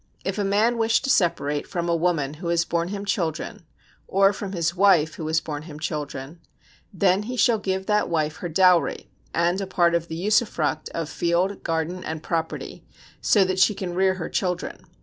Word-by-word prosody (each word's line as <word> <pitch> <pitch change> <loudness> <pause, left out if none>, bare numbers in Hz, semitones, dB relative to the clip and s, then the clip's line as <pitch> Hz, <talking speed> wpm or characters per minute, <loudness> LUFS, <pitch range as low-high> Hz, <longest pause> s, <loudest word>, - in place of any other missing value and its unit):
If 195 +2 -2
a - - +1
man 215 +4 +2
wish 225 +2 +2
to 270 - +1
separate 150 -7 +1
from 170 -1 -3
a 170 - +2
woman 165 -5 0
who 175 - -4
has 170 0 +2
borne 170 0 -1
him 200 +1 -5
children, 175 0 -3 0.4
or 195 +1 +4
from 195 0 -6
his 170 -2 0
wife 175 -5 +4
who 155 - -6
has 160 +1 +2
borne 150 -2 -5
him 155 -1 -10
children: 150 0 -5 0.5
then 190 0 +2
he 250 - -4
shall 235 -2 +3
give 190 -1 -2
that 210 0 +1
wife 155 -2 -1
her 175 - -5
dowry, 180 0 +3 0.2
and 175 +3 +1
a 195 - -3
part 175 -2 +2
of 170 0 0
the 160 - -5
usufruct 175 -5 0
of 165 -2 -2
field, 175 +5 0
garden 165 +2 -2
and 160 0 -5
property, 165 -2 -3 0.4
so 200 -3 +4
that 185 0 -1
she 200 +3 +4
can 180 -2 -4
rear 190 +1 +2
her 175 -3 -4
children. 180 -2 -2
175 Hz, 195 wpm, -24 LUFS, 160-195 Hz, 0.5 s, or